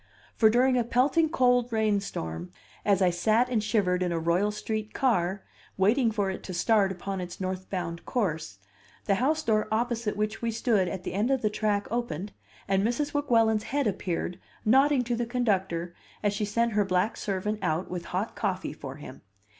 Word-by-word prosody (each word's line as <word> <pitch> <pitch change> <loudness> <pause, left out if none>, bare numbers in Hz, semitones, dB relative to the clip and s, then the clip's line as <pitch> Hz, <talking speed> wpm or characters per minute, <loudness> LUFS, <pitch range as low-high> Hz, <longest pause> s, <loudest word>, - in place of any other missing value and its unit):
For 220 - +5
during 250 +2 +3
a - - +2
pelting 265 +7 +2
cold 245 -5 +2
rainstorm, 200 - -1 0.3
as 200 -2 +3
I 180 - +4
sat 220 +8 +2
and 225 -4 0
shivered 190 -5 +1
in 180 -1 0
a 170 - 0
Royal 170 +5 +1
Street 215 0 -4
car, 195 -7 +1 0.3
waiting 225 +6 +3
for 205 -3 0
it 190 - -6
to 185 - -5
start 200 +1 +3
upon 190 +1 -4
its 175 -1 -7
north 185 0 -4
bound 170 -3 -4
course, 160 - -2 0.5
the 200 - +3
house 310 +4 +1
door 215 -4 +1
opposite 230 -1 -1
which 215 +1 -2
we 235 - 0
stood 220 -4 +1
at 180 +1 -5
the - - -4
end 210 +6 +1
of 265 -3 +1
the 215 - +2
track 205 -1 0
opened, 210 -5 -3 0.4
and 195 0 +2
Mrs. 245 +7 -1
Weguelin's 225 -7 +2
head 285 0 0
appeared, 180 -3 -2 0.3
nodding 270 +3 +4
to 240 0 -1
the 235 0 -2
conductor 190 -8 -1 0.3
as 205 -1 +2
she 210 +1 -1
sent 235 +3 +1
her 205 0 +3
black 190 +3 +1
servant 210 +2 -2
out 175 -1 -1
with 175 -1 -4
hot 190 +5 -3
coffee 185 -3 -2
for 135 -3 -8
him! 140 -4 -11
210 Hz, 185 wpm, -28 LUFS, 185-235 Hz, 0.5 s, For